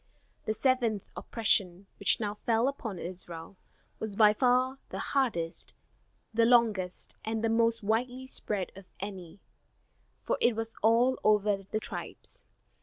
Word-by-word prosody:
The 215 - -1
seventh 235 -5 +1
oppression, 200 -4 +1
which 200 -3 +5
now 205 -2 -2
fell 225 +3 +1
upon 235 -8 -4
Israel, 175 0 -7 0.4
was 220 -2 -4
by 210 0 +6
far 255 +3 +2
the - - -5 0.2
hardest, 210 -12 -1 0.6
the 230 +1 +3
longest 225 -6 +2
and 220 0 -2
the 225 - +2
most 230 0 +2
widely 245 +5 -1
spread 205 -7 -3
of 195 0 -11
any, 190 -2 -7 0.8
for - - -1
it 240 -2 +4
was 225 0 -4
over 235 +4 +4
all 215 0 +5
the 205 0 -2
tribes. - - -7
220 Hz, 135 wpm, -30 LUFS, 195-235 Hz, 0.8 s, by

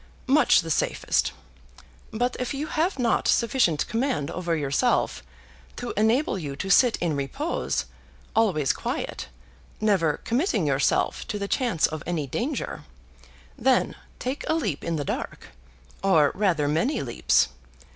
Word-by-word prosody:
"Much 275 -5 +5
the 165 -1 -5
safest. - - +1 0.8
But 245 +3 -1
if 250 +3 -2
you 285 +2 -2
have 320 +3 0
not 240 -3 +1
sufficient 230 - +2
command 230 - -1
over 175 -2 -1
yourself 140 -2 +1 0.5
to - - -5
enable 220 +1 +2
you 145 -5 -5
to 195 +6 -3
sit 245 +3 +5
in 165 -4 -1
repose, 270 - -2 0.5
always 180 -12 +2
quiet, - - -4 0.5
never 190 -8 +2
committing 235 - +1
yourself 140 -1 +1
to 210 - -3
the 200 -1 -3
chance 230 - +1
of 155 -1 -3
any 165 -4 -1
danger, 250 - -3 0.8
then 255 +2 +2 0.2
take 260 +3 -4
a 315 - +3
leap 205 - -2
in 170 -1 -1
the 145 -2 -2
dark; - - -5 0.5
or 160 -7 +4
rather 180 -7 +1
many 165 - 0
leaps. 120 - +2
200 Hz, 135 wpm, -25 LUFS, 155-250 Hz, 0.8 s, Much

